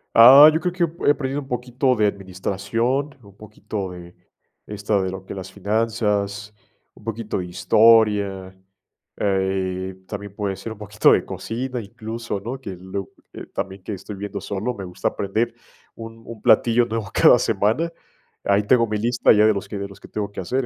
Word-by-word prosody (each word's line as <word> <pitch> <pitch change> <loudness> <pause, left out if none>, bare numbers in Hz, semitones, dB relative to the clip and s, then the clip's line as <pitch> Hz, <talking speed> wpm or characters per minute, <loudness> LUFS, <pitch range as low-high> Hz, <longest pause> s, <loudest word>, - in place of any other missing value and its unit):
Ah, 135 +6 +10
yo 160 - +1
creo 180 0 -2
que 180 - 0 0.2
he 145 - +8
aprendido 140 0 -2
un 135 - -12
poquito 125 +1 0
de 105 -2 +3
administración, 100 +8 -2
un 100 -3 -17
poquito 105 -2 -6
de 90 0 -11 0.5
esta 105 -1 -1
de 95 -1 -2
lo 95 0 -8
que - - -7
es - - -8
las 95 0 -7
finanzas, 105 0 -1 0.4
un - - -19
poquito 115 -1 -4
de 90 - -3
historia, 100 -1 +3 0.6
eh, 95 -1 -1
también 100 -1 -7
puede 100 -2 -2
ser 95 +4 -7
un - - -17
poquito 105 0 +3
de - - +3
cocina, 125 +2 -4
incluso, 115 0 -6
¿no?, 120 +7 -6
que 95 -6 -7
lo 95 +1 -6 0.2
eh, - - -8
también 95 0 -5
que 105 - -5
estoy 100 +2 -8
viviendo 100 0 -6
solo, 100 +5 -3
me 100 -4 -7
gusta 90 - -2
aprender 110 +4 -2 0.4
un 115 0 -10
un 115 -2 -10
platillo 120 +2 +4
nuevo 115 -3 -4
cada 120 - +6
semana, 115 +10 0 0.5
ahí 100 +1 +3
tengo 115 +2 +3
mi 105 - -2
lista 120 +3 +2
ya 105 0 +5
de 110 - +5
los 100 - -5
que 105 - -6
de 100 0 -4
los 100 - -15
que - - -13
tengo 105 -1 -4
que - - -8
hacer, 125 +9 -1
105 Hz, 190 wpm, -22 LUFS, 100-115 Hz, 0.6 s, Ah